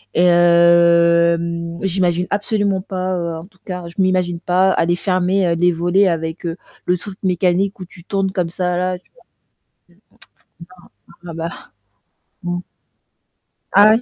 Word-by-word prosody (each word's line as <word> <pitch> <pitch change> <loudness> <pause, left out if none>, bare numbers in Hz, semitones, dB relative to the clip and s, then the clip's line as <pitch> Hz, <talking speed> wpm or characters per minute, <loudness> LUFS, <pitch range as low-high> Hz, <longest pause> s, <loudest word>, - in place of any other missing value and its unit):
Et 175 - +3
hem 170 -1 +3
j'imagine 180 -1 0
absolument 205 -2 0
pas, 185 -4 -3
en 165 - -11
tout 185 -2 -30
cas, 180 -2 -6
je 190 - -3
m'imagine 180 -2 0
pas 185 +1 +2
aller 175 0 +1
fermer, 185 0 +1
heu, 170 - +1
les 175 +1 +3
volets 175 +4 +2
avec, 165 +1 -3
heu, 165 0 -3 0.3
le 180 0 +1
truc 190 +2 -9
mécanique 185 +2 0
où 185 - -7
tu 170 -1 -16
tournes 195 -1 -1
comme 180 -3 -2
ça 180 0 -2
là, 180 0 -1
tu - - -36 1.9
vois? 175 0 -14
Ah - - -10
bah. 165 +1 -4 0.9
Mmh. 175 0 -2 1.2
Ah, 205 +2 +7
ouais? 225 +2 +3
180 Hz, 145 wpm, -18 LUFS, 170-185 Hz, 1.9 s, Ah